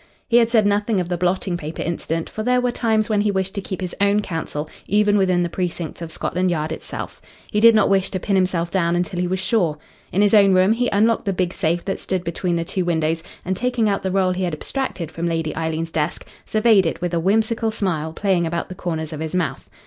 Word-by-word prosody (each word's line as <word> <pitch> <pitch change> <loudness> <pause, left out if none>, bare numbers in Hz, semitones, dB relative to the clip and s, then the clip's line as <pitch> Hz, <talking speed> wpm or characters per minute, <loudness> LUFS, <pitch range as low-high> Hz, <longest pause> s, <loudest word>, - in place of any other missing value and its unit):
He 240 - +4
had 230 -1 +4
said 225 -3 +3
nothing 205 0 +1
of 180 -1 -2
the 175 - -1
blotting 180 0 0
paper 155 -1 -5
incident, 165 -1 -2
for 215 - -6
there 250 +2 +2
were 250 0 +1
times 220 -2 +1
when 210 -3 +1
he 210 - +1
wished 190 -1 -1
to 200 - -3
keep 190 0 -5
his 180 -1 -4
own 200 +1 +3
counsel 160 -4 -4 0.2
even 210 0 +3
within 185 -3 +3
the - - 0
precincts 175 -2 -4
of 165 - -5
Scotland 180 +3 -1
Yard 155 -2 -1
itself. 160 - -6 0.3
He 210 - +1
did 230 +1 +7
not 215 - +4
wish 195 -1 +2
to 185 - -3
pin 200 +2 0
himself 180 -2 +1
down 170 -3 +1
until 175 0 -1
he 180 - 0
was 185 +1 -1
sure. 185 -6 +1 0.3
In 195 +3 +3
his 205 - +3
own 200 -2 +6
room, 185 +3 +5
he 245 +1 0
unlocked 220 +3 +2
the 195 - 0
big 180 0 -1
safe 170 -1 -1
that 195 - -2
stood 185 -2 -2
between 170 +1 -1
the 170 0 -1
two 185 +2 -2
windows, 160 -1 0 0.2
and 190 +1 -1
taking 245 0 0
out 200 -1 0
the 190 - -2
roll 185 -1 +2
he 185 +1 -2
had 175 -3 -1
abstracted 180 - -4
from 170 +1 -3
Lady 165 -2 -1
Eileen's 160 0 -2
desk, 155 +1 -2 0.2
surveyed 215 -4 +4
it - - -3
with 175 -1 -3
a 170 - +2
whimsical 220 +5 +1
smile 175 -8 -2
playing 180 -1 +1
about 170 +1 -3
the - - -5
corners 160 -3 -4
of 150 - -6
his 160 +2 -4
mouth. 180 -3 -2
185 Hz, 245 wpm, -21 LUFS, 170-205 Hz, 0.3 s, did